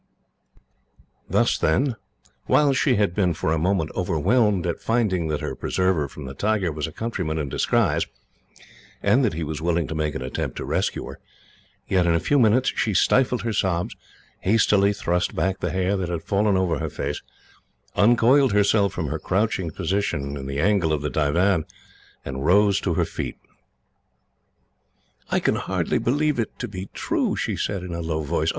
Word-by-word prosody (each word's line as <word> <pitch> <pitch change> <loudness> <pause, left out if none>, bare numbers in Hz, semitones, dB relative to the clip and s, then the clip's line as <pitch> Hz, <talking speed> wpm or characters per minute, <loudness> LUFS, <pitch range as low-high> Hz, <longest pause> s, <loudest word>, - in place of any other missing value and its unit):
Thus, - - +2
then, 125 - +1 0.5
while 145 -2 +4
she 130 -1 +2
had 100 -4 +1
been, 90 -4 +1
for 80 - 0
a 80 - 0
moment, 85 -2 0
overwhelmed 95 - +1
at 85 - -2
finding 105 -8 0
that 75 -1 -2
her - - -3
preserver 90 -6 0
from 70 +1 -10
the 65 - -7
tiger 100 +2 0
was 75 -1 -3
a - - -8
countryman 90 -5 -3
in 75 -3 -2
disguise, - - +1 1.0
and 135 - +4
that 110 - +1
he 80 - -3
was 80 0 -4
willing 85 0 +1
to - - -5
make 75 -1 -2
an 65 - -4
attempt 65 - -4
to - - -4
rescue - - -1
her; - - -9 0.7
yet 90 -2 +2
in 85 - +3
a - - +2
few 145 - +2
minutes 125 +2 +3
she 105 -3 0
stifled 125 -1 +3
her 115 -1 -1
sobs, 90 -3 -1 0.4
hastily 100 -1 +3
thrust 90 -3 -1
back 95 +1 0
the - - -2
hair 95 +1 0
that 95 -3 -2
had 85 -2 -3
fallen 100 -1 +1
over 90 -4 0
her - - -3
face, 70 +1 -4 0.7
uncoiled 120 +3 +4
herself 100 -1 +3
from 90 -4 -3
her - - -3
crouching 95 -3 0
position 80 -5 -2
in 65 -1 -6
the 70 +1 -3
angle 95 -2 +2
of 75 -2 -1
the 75 - -2
divan, 80 +5 +2 0.6
and 65 0 -4
rose 100 +4 +4
to 85 -4 -1
her - - +2
feet. - - -5 1.9
"I - - +2
can - - +1
hardly - - -1
believe 145 +2 +1
it 115 - -3
to 120 - -4
be 95 -2 -7
true," - - -1
she - - -2
said, 100 -3 -3
in 90 -1 -6
a 85 - -3
low 80 -1 -2
voice. 70 - 0
95 Hz, 180 wpm, -23 LUFS, 80-105 Hz, 1.9 s, while